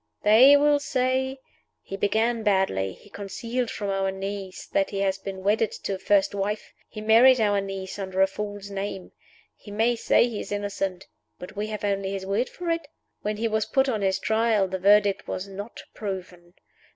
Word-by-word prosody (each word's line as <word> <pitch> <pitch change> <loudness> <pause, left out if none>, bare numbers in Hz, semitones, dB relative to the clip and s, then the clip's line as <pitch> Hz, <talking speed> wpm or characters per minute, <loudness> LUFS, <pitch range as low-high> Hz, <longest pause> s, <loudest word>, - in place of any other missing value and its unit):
They 250 +7 +8
will 290 0 +4
say, 265 -1 0 0.5
'He 195 - -6
began 220 +4 +1
badly; 190 - +1
he - - -18
concealed 230 +4 -3
from 200 -2 -3
our 195 0 0
niece 195 0 -5
that 195 - 0
he 195 -1 -3
had 195 0 0
been 190 -1 -6
wedded 210 +2 +2
to 200 - -2
a 190 - -4
first 200 0 +2
wife; 205 +1 -3 0.2
he 215 - -8
married 235 +4 +6
our 205 -2 +2
niece 195 0 -6
under 190 -1 -4
a - - +7
false 205 0 -6
name. 195 -1 -5 0.4
He - - -15
may 225 +4 +1
say 235 - +3
he 225 -4 -5
is - - -7
innocent; 195 -2 -3 0.3
but 180 +3 -10
we 210 +1 -2
have 215 -1 -5
only 195 -1 -1
his 195 -1 -4
word 200 +6 0
for 350 -1 -4
it. 330 -3 -2 0.3
When 210 0 -2
he 230 +2 0
was 220 -1 0
put 265 0 +2
on 225 -5 -1
his 190 -1 +1
Trial, 220 -1 +2
the 190 0 -4
Verdict 205 +1 +4
was 185 +2 -4
Not 200 +3 -8
Proven. 180 -3 -7
205 Hz, 190 wpm, -25 LUFS, 195-225 Hz, 0.5 s, They